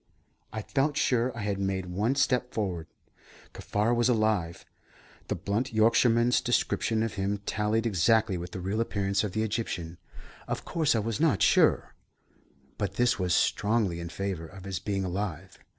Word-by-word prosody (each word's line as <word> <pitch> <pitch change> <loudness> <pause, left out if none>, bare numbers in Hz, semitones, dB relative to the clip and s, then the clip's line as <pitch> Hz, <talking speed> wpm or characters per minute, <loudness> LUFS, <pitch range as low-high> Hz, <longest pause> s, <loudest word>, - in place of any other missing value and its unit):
I 110 -1 -5
felt 145 +4 0
sure 125 -3 +2
I - - -4
had 100 -1 -2
made 95 -1 -1
one 105 +9 0
step 125 -2 +1
forward. 90 -7 -2 0.7
Kaffar 105 +3 0
was 120 +1 +2
alive. 110 -8 0 0.6
The - - -1
blunt 115 +6 -2
Yorkshireman's 115 +2 +4
description 115 -2 +1
of 115 - -2
him 100 +1 -1
tallied 110 +2 0
exactly 110 0 +2
with 90 0 -5
the 90 - -7
real 100 +5 -1
appearance 100 -3 0
of 105 -4 -3
the 110 +1 0
Egyptian. 90 -6 -3 0.5
Of - - -4
course 155 -6 +1
I - - +2
was 115 0 -3
not 150 - +3
sure, - - +3 0.9
but - - -2
this 120 -1 +2
was 90 -1 +1
strongly 105 -5 +1
in 85 0 -5
favour 95 -3 -4
of 95 +2 -12
his 95 -2 -4
being 100 -2 -2
alive. 95 -1 -4
105 Hz, 165 wpm, -28 LUFS, 95-115 Hz, 0.9 s, Yorkshireman's